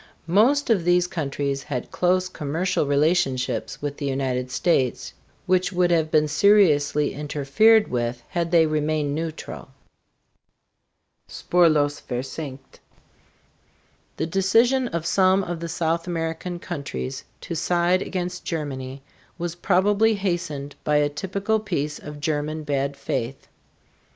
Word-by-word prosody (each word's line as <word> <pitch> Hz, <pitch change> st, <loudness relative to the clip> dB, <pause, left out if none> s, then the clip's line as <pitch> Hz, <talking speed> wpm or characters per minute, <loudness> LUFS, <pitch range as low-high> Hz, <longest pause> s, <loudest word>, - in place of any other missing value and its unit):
Most 235 Hz, -, +3 dB
of 195 Hz, -6 st, +3 dB
these 175 Hz, +1 st, +3 dB
countries 140 Hz, -4 st, -3 dB
had 135 Hz, -4 st, -5 dB
close 185 Hz, +1 st, +1 dB
commercial 165 Hz, 0 st, -1 dB
relationships 140 Hz, -3 st, 0 dB
with 145 Hz, -1 st, -3 dB
the 145 Hz, -, -3 dB
United 130 Hz, -2 st, -1 dB
States, 130 Hz, -1 st, 0 dB, 0.3 s
which 185 Hz, +1 st, +2 dB
would 180 Hz, -1 st, +2 dB
have 160 Hz, -2 st, +2 dB
been 155 Hz, -1 st, +3 dB
seriously 150 Hz, -4 st, +3 dB
interfered 150 Hz, +10 st, +3 dB
with 120 Hz, -1 st, -2 dB
had 170 Hz, -1 st, -1 dB
they 165 Hz, -1 st, +5 dB
remained 155 Hz, -1 st, 0 dB
neutral. 160 Hz, +1 st, -5 dB, 1.6 s
SPURLOS 155 Hz, -5 st, +2 dB
VERSENKT. 135 Hz, +2 st, -6 dB, 1.4 s
The -, -, -1 dB
decision 225 Hz, +9 st, +2 dB
of 170 Hz, -6 st, -4 dB
some 190 Hz, +2 st, +3 dB
of 175 Hz, -2 st, -4 dB
the 170 Hz, 0 st, -5 dB
South 165 Hz, +1 st, -1 dB
American 165 Hz, +1 st, -3 dB
countries 140 Hz, -6 st, -5 dB, 0.2 s
to -, -, -6 dB
side 175 Hz, +3 st, +2 dB
against 180 Hz, -1 st, -4 dB
Germany 135 Hz, -4 st, -5 dB, 0.3 s
was 175 Hz, -1 st, -3 dB
probably 205 Hz, +5 st, +2 dB
hastened 170 Hz, -7 st, -3 dB
by 150 Hz, -, +1 dB
a 145 Hz, 0 st, +3 dB
typical 200 Hz, +7 st, -1 dB
piece 150 Hz, -8 st, -3 dB
of 150 Hz, 0 st, -9 dB
German 155 Hz, +1 st, -2 dB
bad 140 Hz, -1 st, -1 dB
faith. 135 Hz, -1 st, -4 dB
160 Hz, 120 wpm, -24 LUFS, 145-180 Hz, 1.6 s, they